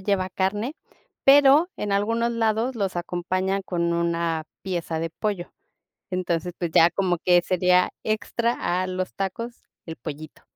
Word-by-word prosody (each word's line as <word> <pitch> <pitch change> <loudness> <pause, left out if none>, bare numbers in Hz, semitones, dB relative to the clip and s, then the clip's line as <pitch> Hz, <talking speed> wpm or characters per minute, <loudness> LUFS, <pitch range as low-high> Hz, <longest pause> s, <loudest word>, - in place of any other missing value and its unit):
lleva 190 -1 0
carne, 205 - -1 0.5
pero 285 +4 +7
en 205 -1 -3
algunos 230 +4 +1
lados 225 +2 0
los 195 -5 -2
acompañan 185 +3 -1
con 170 -2 -1
una 170 -1 0 0.2
pieza 170 -3 -3
de 165 +1 -3
pollo. 195 -1 -3 0.6
Entonces, 180 -2 -1
pues 170 -2 -3
ya 165 +2 +6
como 180 -1 0
que 175 -1 +6
sería 180 0 +3
extra 230 +2 0 0.3
a 185 - -3
los 185 0 -3
tacos, 230 +5 -4 0.2
el 165 - -5
pollito. 155 0 -8
185 Hz, 140 wpm, -24 LUFS, 175-215 Hz, 0.6 s, pero